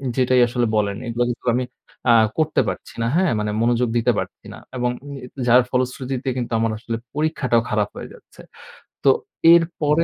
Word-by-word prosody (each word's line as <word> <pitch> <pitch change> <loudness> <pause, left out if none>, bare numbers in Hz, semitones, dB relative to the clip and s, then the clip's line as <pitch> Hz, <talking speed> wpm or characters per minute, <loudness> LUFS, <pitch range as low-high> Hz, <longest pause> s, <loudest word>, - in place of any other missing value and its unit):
যেটাই 130 -1 +3
আসলে 120 0 0
বলেন 100 -1 0
এগুলো 120 +1 0
কিন্তু 120 +1 -6
আমি 125 - 0 0.5
আ - - +7 0.2
করতে 155 -1 +2
পারছি - - -7
না। 115 - +1
হ্যাঁ? 185 -1 +3
মানে 105 0 -1
মনোযোগ 120 0 +2
দিতে 120 +1 +3
পারছি - - -7
না - - -10 0.2
এবং 125 0 0 0.6
যার 125 +2 +7
ফলশ্রুতিতে 130 +1 -2
কিন্তু 120 -1 -3
আমার 115 0 +1
আসলে 115 +1 -4 0.2
পরীক্ষাটাও 150 -6 +1
খারাপ 105 -2 0
হয়ে - - -8
যাচ্ছে। - - -17 0.6
তো - - +5 0.4
এরপরে 165 -2 +2
125 Hz, 165 wpm, -21 LUFS, 115-135 Hz, 0.6 s, আ